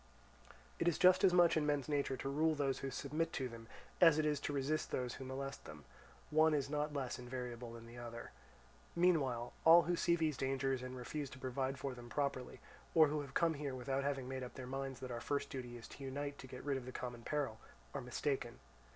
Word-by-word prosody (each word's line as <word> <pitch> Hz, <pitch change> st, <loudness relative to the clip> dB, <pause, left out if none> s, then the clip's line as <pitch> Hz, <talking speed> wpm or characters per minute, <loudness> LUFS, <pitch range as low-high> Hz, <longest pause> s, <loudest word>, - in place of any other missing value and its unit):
It 170 Hz, -, +1 dB
is 170 Hz, -, +3 dB
just 185 Hz, 0 st, +6 dB
as 190 Hz, -, +7 dB
much 175 Hz, -1 st, +6 dB
in 155 Hz, -, +2 dB
men's 145 Hz, -2 st, +1 dB
nature 140 Hz, -3 st, 0 dB
to 135 Hz, -, -4 dB
rule 155 Hz, +3 st, +2 dB
those 140 Hz, -2 st, 0 dB
who 135 Hz, -, -3 dB
submit 145 Hz, +5 st, -2 dB
to 130 Hz, -, -1 dB
them, 115 Hz, -1 st, -10 dB, 0.3 s
as 165 Hz, -3 st, +8 dB
it 155 Hz, -, +2 dB
is 150 Hz, -2 st, +1 dB
to 145 Hz, -, -3 dB
resist 145 Hz, +2 st, 0 dB
those 125 Hz, -1 st, -2 dB
who -, -, -7 dB
molest 135 Hz, +1 st, -5 dB
them; 75 Hz, -2 st, -10 dB, 0.5 s
one 155 Hz, 0 st, +5 dB
is 140 Hz, -1 st, -1 dB
not 150 Hz, 0 st, 0 dB
less 135 Hz, -4 st, -3 dB
invariable 125 Hz, -1 st, -5 dB
than 115 Hz, 0 st, -9 dB
the 120 Hz, +1 st, -10 dB
other. 115 Hz, -1 st, -7 dB, 0.6 s
Meanwhile 140 Hz, -9 st, +2 dB
all 170 Hz, +1 st, +9 dB
who 175 Hz, +3 st, +1 dB
see 170 Hz, 0 st, +3 dB
these 155 Hz, -5 st, 0 dB
dangers 135 Hz, 0 st, 0 dB
and 130 Hz, 0 st, -6 dB
refuse 140 Hz, +3 st, -4 dB
to -, -, -10 dB
provide 130 Hz, +1 st, -2 dB
for 135 Hz, 0 st, -3 dB
them 120 Hz, -1 st, -10 dB
properly, 140 Hz, -2 st, -2 dB, 0.4 s
or 155 Hz, -2 st, +7 dB
who 150 Hz, 0 st, 0 dB
have 140 Hz, -2 st, -9 dB
come 170 Hz, -1 st, +3 dB
here 140 Hz, -3 st, -4 dB
without 135 Hz, +2 st, -1 dB
having 135 Hz, -2 st, -1 dB
made 130 Hz, 0 st, -4 dB
up 125 Hz, -, -7 dB
their 130 Hz, -, -6 dB
minds 135 Hz, 0 st, -4 dB
that 130 Hz, -1 st, -5 dB
our 120 Hz, -1 st, -4 dB
first 140 Hz, +1 st, -1 dB
duty 125 Hz, -2 st, -5 dB
is 115 Hz, -, -10 dB
to 140 Hz, -, -10 dB
unite 140 Hz, +2 st, -4 dB
to 130 Hz, -, -9 dB
get 125 Hz, 0 st, -8 dB
rid 140 Hz, -2 st, +1 dB
of 125 Hz, -1 st, -7 dB
the -, -, -5 dB
common 120 Hz, -2 st, -5 dB
peril, 135 Hz, -4 st, -2 dB, 0.3 s
are -, -, -3 dB
mistaken. 125 Hz, 0 st, -2 dB
135 Hz, 230 wpm, -37 LUFS, 125-150 Hz, 0.6 s, all